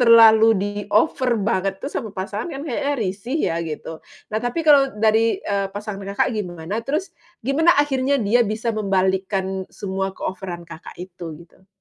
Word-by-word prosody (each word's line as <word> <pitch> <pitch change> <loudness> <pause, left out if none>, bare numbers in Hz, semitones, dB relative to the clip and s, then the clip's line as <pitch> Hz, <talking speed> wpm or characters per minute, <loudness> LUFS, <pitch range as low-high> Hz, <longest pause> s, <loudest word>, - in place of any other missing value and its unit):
terlalu 225 -2 +7
diover 205 +6 +1
banget 195 -2 -1
tuh 280 - -3
sama 220 -7 -5
pasangan 200 +3 -4
kan 275 - -5
kayaknya 285 0 -1
risih 225 +4 -3
ya, 165 - -1
gitu. 160 +1 -6 0.3
Nah, 215 - 0
tapi 245 +8 -2
kalau 280 -3 +5
dari, 220 +1 +2
eee, 200 -1 -1
pasangan 205 -1 -6
Kakak 200 - +2
gimana? 180 +1 -4
Terus, 315 +8 -1 0.3
gimana 310 +7 +4
akhirnya 280 -1 +2
dia 230 +3 +3
bisa 220 +3 -1
membalikkan 190 -2 0
semua 190 -1 -4
keoveran 180 -3 -5
Kakak 165 -1 -11
itu, 175 -3 -8
gitu? 185 +2 -24
210 Hz, 150 wpm, -22 LUFS, 190-245 Hz, 0.3 s, terlalu